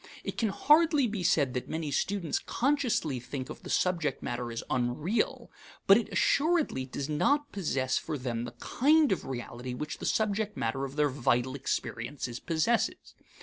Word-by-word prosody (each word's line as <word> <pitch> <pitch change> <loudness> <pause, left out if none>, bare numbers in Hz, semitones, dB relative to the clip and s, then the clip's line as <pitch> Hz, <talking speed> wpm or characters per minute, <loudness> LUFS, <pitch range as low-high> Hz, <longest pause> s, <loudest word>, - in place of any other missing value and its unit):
It - - -4
can 225 - +1
hardly 300 +5 +4
be 210 -4 -2
said 145 -6 +2
that 125 - -4
many 160 -2 -3
students 185 +3 0
consciously 245 - 0
think 130 +2 -6
of - - -9
the - - -9
subject 170 -7 0
matter 120 0 -3
as 115 - -4
unreal; 150 - -1 0.3
but 195 - +8
it 230 0 0
assuredly 305 - +2
does 135 +1 -4
not 285 - +1
possess 135 -9 0
for 150 - -4
them 120 -3 -3
the 120 - -9
kind 300 +3 +3
of 190 - -1
reality 125 0 -5
which 150 +4 -5
the - - -3
subject 215 -1 0
matter 125 +4 -1
of 135 0 -8
their 150 -1 +3
vital 130 -1 +1
experiences 125 -2 -3
possesses. 165 +9 0
150 Hz, 165 wpm, -29 LUFS, -, 0.3 s, but